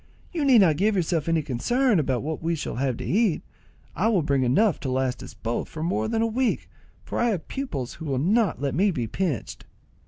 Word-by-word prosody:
You 320 -5 -1
need 255 -5 +7
not 160 -6 +4
give 210 +3 +2
yourself 165 -3 0
any 165 -2 +2
concern 215 - +1
about 130 -4 0
what 155 +1 -4
we 165 +1 0
shall 145 -5 -4
have 130 -2 0
to - - -6
eat. 205 -3 +1 0.5
I 210 - +1
will 200 -8 +2
bring 140 -2 +1
enough 150 - +3
to 135 - -4
last 130 0 -1
us - - -10
both 115 +1 -3
for 155 - -6
more 110 -10 0
than 225 0 0
a - - +3
week, 245 +3 0 0.4
for - - -4
I 240 - +3
have 190 -8 -2
pupils 145 - -4
who 160 - -9
will 135 -3 -1
not 200 - +2
let 140 0 -1
me 195 +8 +3
be 130 -11 -2
pinched." 150 - -3
165 Hz, 225 wpm, -25 LUFS, 135-215 Hz, 0.5 s, need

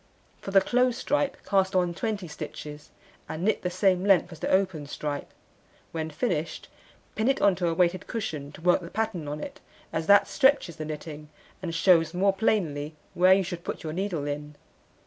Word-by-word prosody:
For - - -6
the 195 0 +5
close 250 +2 +2
stripe 290 +1 0
cast 190 0 +2
on 180 -2 +2
20 205 0 -3
stitches, 150 -1 -8 0.4
and 160 - -4
knit 215 - +1
the 180 - -1
same 185 0 +2
length 190 -3 +4
as 165 - -10
the - - -2
open 185 -6 +1
stripe. 145 0 -4 0.6
When 160 -1 -3
finished, 165 -1 -2 0.4
pin 220 - 0
it 270 +1 +2
on 200 - +5
to 180 -2 0
a 165 - 0
weighted 180 +1 +1
cushion 160 - -4
to - - -12
work 180 +2 +3
the 170 - -8
pattern 210 -7 -2
on 150 +1 -4
it, - - -7 0.3
as 160 0 -2
that 200 0 +6
stretches 265 - +2
the 155 - -4
knitting, 150 0 -7 0.3
and 170 -3 -4
shews 165 -1 +4
more 195 +2 +3
plainly 160 -8 0 0.2
where 185 +1 +6
you 195 - +1
should 175 -1 -6
put - - -5
your 155 -1 -4
needle 180 -5 -2
in. 150 +1 -5
180 Hz, 190 wpm, -27 LUFS, 155-195 Hz, 0.6 s, that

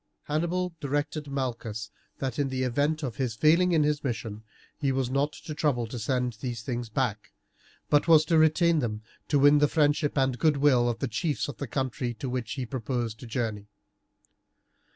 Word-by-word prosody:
Hannibal 170 +4 -1
directed 145 +1 -2
Malchus 115 -6 -4 0.3
that, 135 -1 -3
in 140 -1 +1
the 130 0 -1
event 145 +5 0
of 120 -6 -4
his 125 -5 -1
failing 165 +9 +4
in 160 -3 +4
his 150 0 0
mission, 110 -4 -4 0.4
he 140 -3 +1
was 130 -1 -1
not 140 +2 +1
to 155 +1 -8
trouble 145 -6 0
to 120 +2 -6
send 125 +1 -1
these 120 -3 -4
things 120 -2 -4
back, 110 -3 -2 0.5
but 145 +2 +3
was 155 -2 +6
to 160 0 +3
retain 160 +1 +4
them 110 -5 -3 0.2
to 145 - +2
win 145 +1 +6
the 145 - +4
friendship 145 0 +1
and 130 -2 +1
goodwill 140 -5 +4
of 120 - -2
the 135 - -2
chiefs 145 +7 -1
of 145 - -7
the 140 - -4
country 125 -1 -2
to 130 - -5
which 125 -3 -3
he 130 -3 -3
proposed 120 -3 -3
to 120 - -9
journey. 110 -4 -3
135 Hz, 185 wpm, -27 LUFS, 120-150 Hz, 0.5 s, was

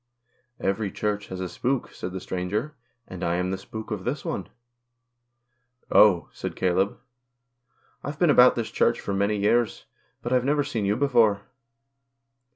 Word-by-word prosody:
"Every 100 +1 -1
Church 105 -1 -2
has 95 - -6
a 95 - -2
spook," 130 +7 -2
said 90 - -6
the 95 - -5
stranger, 100 +12 -3 0.2
" 120 0 -47
and 90 0 -7
I 85 - +1
am 90 +1 -1
the - - 0
spook 110 +3 -8
of 105 -4 -3
this 135 +6 -3
one." - - -3 0.7
" 120 +1 -38
Oh," 95 -5 +6
said - - -6
Caleb, 95 +2 +1 0.5
" 120 +2 -40
I've 145 +1 -5
been 170 -2 +4
about 125 -1 +7
this 115 -2 -3
Church - - +1
a 100 - 0
many 100 +2 +1
years, 110 +3 +1 0.4
but 120 - -1
I've 125 -1 +3
never 145 +2 +2
seen 120 -8 -2
you 100 +1 +2
before." 115 -6 +3
110 Hz, 170 wpm, -25 LUFS, 95-125 Hz, 0.7 s, about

